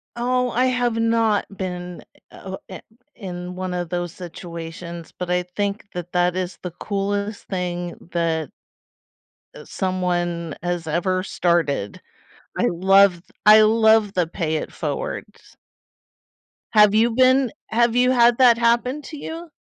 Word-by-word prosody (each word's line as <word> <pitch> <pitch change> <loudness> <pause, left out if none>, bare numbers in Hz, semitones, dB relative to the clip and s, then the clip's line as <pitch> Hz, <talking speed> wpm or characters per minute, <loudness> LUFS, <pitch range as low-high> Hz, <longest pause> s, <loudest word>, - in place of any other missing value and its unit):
Oh, 250 +1 0
I 250 +3 +2
have 245 -2 +1
not 230 -2 +2
been, 180 -1 -5 0.3
uh - - -16
eh - - -12
o 190 - -6
oh - - -4
eh 185 - -8 0.3
in 180 -3 -7
one 185 0 -4
of 175 -2 -3
those 175 -1 -3
situations, 170 -1 -8
but 180 -1 -4
I 180 0 +1
think 200 +3 -4
that 175 0 -6
that 180 0 +1
is 185 -1 -3
the 180 - -5
coolest 200 +3 -3
thing 175 -2 -3 0.2
that 165 -3 -1 1.1
uh, - - -10
someone 175 -3 -2
has 175 -2 -2
ever 185 +4 0
started. 165 - 0 0.6
I - - +2
loved 190 0 +3 0.2
I 215 +1 +9
loved 220 -1 +4
the 180 -2 +2
"pay 160 -1 -3
it 155 - -4
forwards." - - -6 1.2
Have 210 -1 +6
you 230 +2 +4
been 255 +1 +4 0.2
have 235 +1 +2
you 250 +1 +4
had 240 -1 +4
that 245 -3 +6
happen 240 +5 +1
to 310 - -9
you? 325 +3 -7
185 Hz, 145 wpm, -22 LUFS, 175-230 Hz, 1.2 s, I